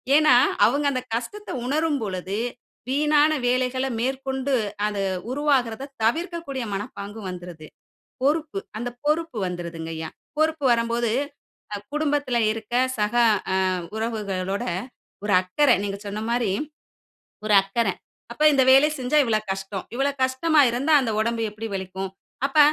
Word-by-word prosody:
ஏனா 305 Hz, -4 st, +6 dB, 0.3 s
அவங்க 285 Hz, +5 st, +2 dB
அந்த 255 Hz, -2 st, -1 dB
கஷ்டத்த 415 Hz, -, -5 dB, 0.2 s
உணரும் 300 Hz, +1 st, +1 dB
பொழுது 190 Hz, 0 st, -3 dB, 0.5 s
வீணான 300 Hz, +2 st, +4 dB
வேலைகள 255 Hz, +1 st, +1 dB
மேற்கொண்டு 265 Hz, +2 st, -1 dB, 0.3 s
அது 205 Hz, -1 st, -2 dB, 0.3 s
உருவாகுறத 270 Hz, -3 st, +1 dB, 0.2 s
தவிர்க்கக்கூடிய 320 Hz, +1 st, -1 dB
மனப்பாங்கு 205 Hz, 0 st, -6 dB
வந்துருது. 175 Hz, -3 st, -8 dB, 0.5 s
பொறுப்பு 290 Hz, -5 st, +1 dB, 0.2 s
அந்த 240 Hz, +2 st, -3 dB, 0.2 s
பொறுப்பு 305 Hz, -4 st, 0 dB
வந்துருதுங்கையா. 165 Hz, -2 st, -5 dB, 0.3 s
பொறுப்பு 315 Hz, -1 st, +1 dB
வரம்போது 235 Hz, -1 st, +1 dB, 0.8 s
குடும்பத்துல 290 Hz, -4 st, 0 dB
இருக்க 225 Hz, 0 st, -9 dB, 0.3 s
சக 210 Hz, +2 st, 0 dB, 0.4 s
அ -, -, +2 dB, 0.4 s
உறவுகளோட 200 Hz, -4 st, -2 dB, 0.6 s
ஒரு 210 Hz, -, 0 dB
அக்கற 250 Hz, +10 st, +2 dB
நீங்க 200 Hz, -1 st, -3 dB
சொன்ன 205 Hz, +1 st, -4 dB
மாரி, 235 Hz, -3 st, +1 dB, 0.9 s
ஒரு 215 Hz, -1 st, +3 dB
அக்கற. 210 Hz, +4 st, -1 dB, 0.5 s
அப்ப 300 Hz, -, -4 dB
இந்த 270 Hz, -2 st, +4 dB
வேலை 270 Hz, +3 st, +7 dB
செஞ்சா 255 Hz, +4 st, 0 dB
இவ்வளோ 220 Hz, -2 st, +1 dB
கஷ்டம். 195 Hz, 0 st, -5 dB
இவ்ளோ 275 Hz, +3 st, +1 dB
கஷ்டமா 295 Hz, +4 st, +3 dB
இருந்தா 265 Hz, +7 st, 0 dB
அந்த 240 Hz, -4 st, -1 dB
உடம்பு 230 Hz, +1 st, 0 dB
எப்டி 220 Hz, +2 st, -6 dB
வலிக்கும்? 190 Hz, 0 st, -4 dB, 0.4 s
அப்ப 280 Hz, +2 st, -1 dB
240 Hz, 120 wpm, -24 LUFS, 205-285 Hz, 0.9 s, வேலை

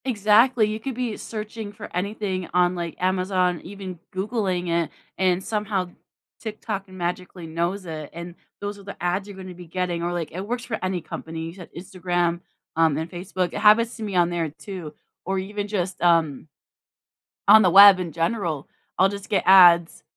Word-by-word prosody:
Exactly. 225 Hz, 0 st, +4 dB
You 215 Hz, +1 st, -3 dB
could 260 Hz, +2 st, -5 dB
be 245 Hz, -3 st, -2 dB
searching 215 Hz, -1 st, -6 dB
for 205 Hz, 0 st, -10 dB
anything 190 Hz, -1 st, -2 dB
on, 180 Hz, 0 st, +3 dB
like, 170 Hz, -2 st, -4 dB
Amazon, 185 Hz, -1 st, +1 dB
even 190 Hz, -2 st, -8 dB
Googling 190 Hz, -3 st, -1 dB
it, 170 Hz, -1 st, +1 dB, 0.3 s
and 185 Hz, 0 st, +1 dB
somehow 205 Hz, -4 st, -2 dB, 0.5 s
TikTok 215 Hz, -2 st, -5 dB
magically 180 Hz, -1 st, -5 dB
knows 170 Hz, +4 st, -2 dB
it 155 Hz, -3 st, -6 dB
and 170 Hz, +1 st, -7 dB, 0.3 s
those 205 Hz, 0 st, -5 dB
are -, -, -13 dB
the 200 Hz, -, -9 dB
ads 180 Hz, +3 st, -1 dB
you're 200 Hz, -2 st, -10 dB
gonna 185 Hz, -1 st, -8 dB
be 175 Hz, -1 st, -12 dB
getting 175 Hz, 0 st, -2 dB
or, 175 Hz, +1 st, -1 dB
like, 175 Hz, -3 st, -3 dB
it 185 Hz, -, -5 dB
works 245 Hz, +1 st, -3 dB
for 225 Hz, -2 st, -3 dB
any 185 Hz, -1 st, -1 dB
company, 160 Hz, +1 st, -7 dB
you 165 Hz, -, -7 dB
said 180 Hz, -2 st, -11 dB
Instagram, 175 Hz, -2 st, -1 dB, 0.3 s
um, 160 Hz, -2 st, +3 dB
and 160 Hz, +1 st, -3 dB
Facebook. 180 Hz, 0 st, -3 dB
It -, -, -3 dB
happens 220 Hz, +3 st, +5 dB
to 225 Hz, -, -6 dB
me 205 Hz, -3 st, -4 dB
on 175 Hz, -1 st, +4 dB
there, 170 Hz, -2 st, -1 dB
too, 160 Hz, +1 st, -8 dB, 0.3 s
or 190 Hz, +2 st, -1 dB
even 205 Hz, +2 st, -4 dB
just, 190 Hz, -3 st, -3 dB
um 165 Hz, -5 st, +2 dB, 1.0 s
on 215 Hz, +2 st, +9 dB
the 185 Hz, -, +5 dB
web, 195 Hz, +1 st, +9 dB
in 175 Hz, -2 st, -4 dB
general. 165 Hz, -3 st, -2 dB, 0.3 s
I'll 190 Hz, -, +5 dB
just 200 Hz, 0 st, -8 dB
get 200 Hz, -, +1 dB
ads. 175 Hz, -3 st, +6 dB
185 Hz, 180 wpm, -24 LUFS, 175-205 Hz, 1.0 s, on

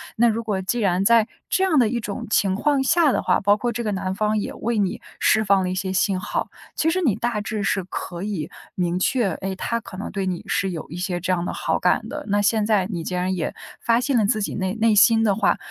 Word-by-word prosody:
那 235 Hz, +1 st, +4 dB
如 230 Hz, +1 st, -2 dB
果 205 Hz, -4 st, -2 dB
既 215 Hz, +6 st, -1 dB
然 190 Hz, -3 st, +1 dB
在 225 Hz, +1 st, +4 dB, 0.2 s
这 380 Hz, -, +2 dB
样 345 Hz, -5 st, +2 dB
的 240 Hz, -5 st, +4 dB
一 235 Hz, +1 st, -1 dB
种 210 Hz, -2 st, -5 dB
情 195 Hz, -3 st, +2 dB
况 280 Hz, +5 st, +1 dB
下 310 Hz, +2 st, +4 dB
的 -, -, 0 dB
话， -, -, +1 dB
包 205 Hz, +1 st, +4 dB
括 240 Hz, +3 st, -1 dB
这 235 Hz, +2 st, -3 dB
个 215 Hz, -, -1 dB
男 190 Hz, -1 st, -2 dB
方 215 Hz, +1 st, +1 dB
也 205 Hz, -, -3 dB
为 235 Hz, 0 st, -2 dB
你 195 Hz, -3 st, -1 dB, 0.2 s
释 220 Hz, -, +3 dB
放 200 Hz, -1 st, +3 dB
了 185 Hz, -, -1 dB
一 185 Hz, -, -2 dB
些 190 Hz, 0 st, -2 dB
信 190 Hz, 0 st, +1 dB
号， -, -, -3 dB, 0.2 s
其 320 Hz, -, +1 dB
实 370 Hz, +3 st, 0 dB
你 255 Hz, -, +2 dB
大 225 Hz, -1 st, -2 dB
致 215 Hz, 0 st, -3 dB
是 195 Hz, 0 st, 0 dB
可 175 Hz, 0 st, -6 dB
以 200 Hz, -7 st, -3 dB, 0.3 s
明 175 Hz, -1 st, 0 dB
确， 205 Hz, +1 st, +1 dB
诶， 190 Hz, 0 st, -2 dB
他 230 Hz, +4 st, -1 dB
可 185 Hz, -, -10 dB
能 200 Hz, -, -5 dB
对 195 Hz, -2 st, -3 dB
你 180 Hz, -2 st, -2 dB
是 195 Hz, -1 st, 0 dB
有 165 Hz, -3 st, -6 dB
一 160 Hz, -, -8 dB
些 180 Hz, 0 st, -2 dB
这 185 Hz, +1 st, 0 dB
样 175 Hz, -1 st, -1 dB
的 -, -, -3 dB
好 -, -, -1 dB
感 -, -, +1 dB
的。 -, -, -6 dB
那 205 Hz, +1 st, +2 dB
现 215 Hz, +1 st, +2 dB
在 205 Hz, -4 st, +2 dB
你 175 Hz, -6 st, -4 dB
既 180 Hz, -, -4 dB
然 180 Hz, +1 st, 0 dB
也 170 Hz, -, -3 dB, 0.3 s
发 230 Hz, 0 st, +3 dB
现 265 Hz, 0 st, +1 dB
了 220 Hz, -, +3 dB
自 215 Hz, +1 st, +1 dB
己 200 Hz, -, -3 dB
内 190 Hz, -1 st, -1 dB
内 225 Hz, -1 st, +3 dB
心 225 Hz, +2 st, +6 dB
的 205 Hz, -3 st, +3 dB
话， 205 Hz, -, +2 dB
205 Hz, 285 characters per minute, -23 LUFS, 190-230 Hz, 0.3 s, 心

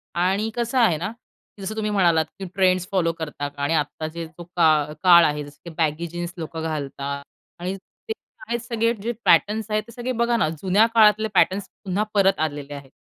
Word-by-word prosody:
आणि 190 Hz, +5 st, +1 dB
कसं 240 Hz, +2 st, -1 dB
आहेना, 195 Hz, -4 st, +2 dB
की 230 Hz, -3 st, -21 dB
जसं 205 Hz, +3 st, -4 dB
तुम्ही 215 Hz, -1 st, -1 dB
म्हणालात, 170 Hz, -5 st, +3 dB
की, 195 Hz, -, -4 dB
ट्रेंड्स 185 Hz, -1 st, +2 dB
फॉलो 180 Hz, -4 st, +2 dB
करता 150 Hz, -2 st, -4 dB
का? 145 Hz, 0 st, -10 dB
आणि 145 Hz, -, +1 dB
आत्ता 155 Hz, 0 st, -1 dB
जे 165 Hz, +1 st, -6 dB
जो 160 Hz, +2 st, -11 dB
का 155 Hz, -3 st, +3 dB
काळ 170 Hz, -2 st, +8 dB
आहे, 150 Hz, -1 st, -1 dB
जसं 145 Hz, 0 st, -13 dB
की -, -, -6 dB
बॅगी 160 Hz, +1 st, 0 dB
जीन्स 175 Hz, +1 st, -5 dB
लोकं 160 Hz, 0 st, -5 dB
घालतात 140 Hz, -2 st, -4 dB, 0.4 s
आणि 185 Hz, +2 st, -3 dB
ते 195 Hz, -, -9 dB, 0.3 s
आहेत 235 Hz, +1 st, -1 dB
सगळे 230 Hz, -1 st, 0 dB
जे 230 Hz, +3 st, -1 dB
पॅटर्न्स 215 Hz, +1 st, +3 dB
आहेत 215 Hz, 0 st, +1 dB
ते -, -, -11 dB
सगळे 245 Hz, +2 st, -4 dB
बघाना 235 Hz, -6 st, +1 dB
जुन्या 190 Hz, +7 st, +3 dB
काळातले 215 Hz, -1 st, +5 dB
पॅटर्न्स 190 Hz, +1 st, +2 dB, 0.2 s
पुन्हा 195 Hz, +2 st, 0 dB
परत 195 Hz, -2 st, +3 dB
आलेले 145 Hz, -1 st, -6 dB
आहेत. 140 Hz, -1 st, -9 dB
180 Hz, 195 wpm, -23 LUFS, 155-215 Hz, 0.4 s, काळ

